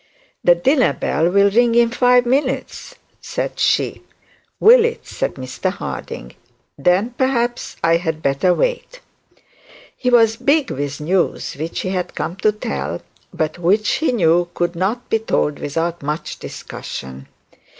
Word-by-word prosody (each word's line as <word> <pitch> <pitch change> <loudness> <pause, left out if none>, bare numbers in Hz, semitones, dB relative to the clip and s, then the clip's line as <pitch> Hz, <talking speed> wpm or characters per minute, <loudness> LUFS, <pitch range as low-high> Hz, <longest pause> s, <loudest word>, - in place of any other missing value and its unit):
'The 175 - +6
dinner 255 - +2
bell 165 +2 0
will 200 +2 +4
ring 235 +2 +3
in 235 -1 +4
five 245 0 +4
minutes,' 265 +1 -2 0.3
said - - -4
she. - - +1 0.6
'Will 470 +1 +7
it?' 470 +1 -2
said - - -3
Mr 130 -1 -3
Harding. - - -7 0.4
'Then, 180 - +2
perhaps 240 -2 0
I 165 0 +4
had 160 -2 -4
better 140 +6 +2
wait.' - - -1 1.0
he 250 - -1
was 225 -2 +4
big 285 +2 +2
with 145 +1 -4
news 180 +4 0
which 160 +4 -4
he 185 - -3
had 185 -1 -3
come 170 - -3
to 215 +2 +2
tell, 210 - -4 0.3
but 155 +2 -3
which 200 +5 +2
he 320 - +1
knew 175 -5 +2
could 175 0 -1
not 205 +8 -2
be 225 - +1
told 150 -9 -1
without 165 +4 -2
much 150 +3 -4
discussion. 65 0 -8
190 Hz, 145 wpm, -19 LUFS, 165-245 Hz, 1.0 s, Will